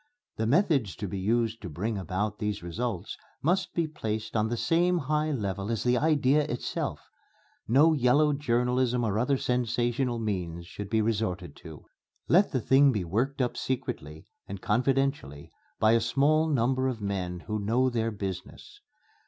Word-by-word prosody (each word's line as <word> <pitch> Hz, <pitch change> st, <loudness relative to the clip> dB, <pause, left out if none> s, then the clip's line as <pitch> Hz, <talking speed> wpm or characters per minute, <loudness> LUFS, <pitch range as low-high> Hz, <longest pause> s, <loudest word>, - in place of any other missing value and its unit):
The 110 Hz, -, 0 dB
methods 140 Hz, -, +2 dB
to 105 Hz, -, -5 dB
be 95 Hz, +1 st, -4 dB
used 115 Hz, +3 st, 0 dB
to 95 Hz, -, -6 dB
bring 105 Hz, +9 st, -3 dB
about 95 Hz, +3 st, -3 dB
these 105 Hz, -4 st, -3 dB
results 100 Hz, +2 st, -4 dB, 0.2 s
must 180 Hz, +4 st, 0 dB
be 170 Hz, -2 st, +1 dB
placed 110 Hz, -8 st, -4 dB
on 110 Hz, 0 st, +2 dB
the 120 Hz, -, -2 dB
same 170 Hz, +9 st, +2 dB
high 150 Hz, 0 st, 0 dB
level 100 Hz, -7 st, -3 dB
as 115 Hz, -2 st, -1 dB
the 125 Hz, 0 st, +3 dB
idea 145 Hz, 0 st, +3 dB
itself. 125 Hz, -4 st, -4 dB, 0.6 s
No 145 Hz, +8 st, +5 dB
yellow 145 Hz, +2 st, +3 dB
journalism 125 Hz, -2 st, +1 dB
or 110 Hz, -2 st, 0 dB
other 135 Hz, +3 st, +2 dB
sensational 120 Hz, 0 st, 0 dB
means 90 Hz, -6 st, -3 dB
should 100 Hz, +3 st, -8 dB
be 110 Hz, 0 st, +2 dB
resorted 95 Hz, -8 st, -2 dB
to. 80 Hz, -3 st, -12 dB, 0.4 s
Let 190 Hz, +5 st, +4 dB
the 130 Hz, -, 0 dB
thing 135 Hz, +4 st, +5 dB
be 105 Hz, -6 st, -1 dB
worked 125 Hz, +10 st, -1 dB
up 125 Hz, -, -2 dB
secretly 80 Hz, -, -4 dB, 0.2 s
and 100 Hz, 0 st, -6 dB
confidentially 125 Hz, -, -1 dB, 0.3 s
by 110 Hz, -, +4 dB
a 115 Hz, 0 st, +4 dB
small 145 Hz, +7 st, +2 dB
number 130 Hz, -1 st, +1 dB
of 125 Hz, -4 st, -3 dB
men 95 Hz, -4 st, -3 dB
who 105 Hz, +2 st, -3 dB
know 120 Hz, +5 st, +1 dB
their 115 Hz, -1 st, 0 dB
business. 100 Hz, -, -7 dB
115 Hz, 160 wpm, -28 LUFS, 100-135 Hz, 0.6 s, No